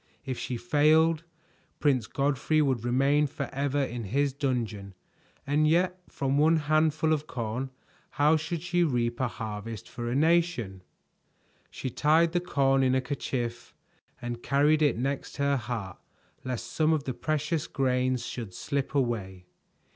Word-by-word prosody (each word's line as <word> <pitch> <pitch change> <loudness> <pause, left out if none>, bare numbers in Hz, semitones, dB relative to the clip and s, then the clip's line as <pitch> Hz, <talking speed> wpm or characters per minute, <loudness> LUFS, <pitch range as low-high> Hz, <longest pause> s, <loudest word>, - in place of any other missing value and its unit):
If 130 -3 -4
she 125 - -3
failed, 155 +6 +3 0.5
Prince 130 -7 +2
Godfrey 145 +2 +1
would 130 -6 +1
remain 135 +4 +3
forever 140 +1 -2
in 120 -3 -4
his 140 +7 0
dungeon, 115 -8 -3 0.5
and 150 +2 +2
yet 180 +3 +2
from 135 +1 0
one 160 +2 +5
handful 155 +1 +2
of 155 0 -2
corn 125 0 -3 0.4
how 150 +3 +3
should 160 +1 -3
she 175 0 +1
reap 120 -6 0
a 130 - +1
harvest 110 0 -6
for 120 -1 -5
a 120 - -1
nation? 155 - +1 0.9
She 130 - -5
tied 160 +5 +3
the 175 - +1
corn 135 -6 +2
in 130 -1 +3
a 130 - +2
kerchief 120 -3 -4 0.4
and 120 -2 -5
carried 150 +3 +3
it 145 -6 +3
next 135 +3 -3
her 140 0 +2
heart 115 -8 -4 0.4
lest 125 -2 -4
some 160 0 +2
of 155 -3 0
the 130 - -3
precious 155 +2 -1
grains 130 -2 0
should 110 -7 -6
slip 140 +6 -3
away. 100 -9 -1
135 Hz, 145 wpm, -28 LUFS, 120-155 Hz, 0.9 s, one